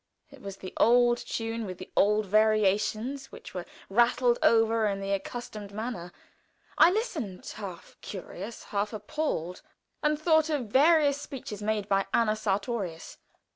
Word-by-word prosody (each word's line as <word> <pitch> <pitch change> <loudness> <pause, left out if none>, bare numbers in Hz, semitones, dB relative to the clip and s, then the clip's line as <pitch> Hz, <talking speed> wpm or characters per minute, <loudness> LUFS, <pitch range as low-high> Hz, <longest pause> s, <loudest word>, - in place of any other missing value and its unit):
It 280 - -15
was 195 -1 -7
the 185 - -9
old 240 +1 +5
tune 225 0 -3
with 185 -1 -6
the 185 - -10
old 210 +1 +3
variations, 215 +5 +1
which - - -11
were 180 -2 -5 0.2
rattled 240 +3 +3
over 225 -1 +4
in 200 -1 -1
the 195 0 -3
accustomed 205 0 -5
manner. 205 -5 -5 0.6
I 325 - +7
listened, 325 - -3
half 190 -5 -8
curious, 200 +3 -7
half 205 +2 -2
appalled, 210 - -3 0.4
and 300 -1 +1
thought 315 -1 +3
of 275 -8 -2
various 290 +2 +4
speeches 230 -8 -7
made 210 -1 -1
by 195 -1 +1
Anna 215 -2 +3
Sartorius. 200 -4 -3
215 Hz, 140 wpm, -28 LUFS, 200-250 Hz, 0.6 s, I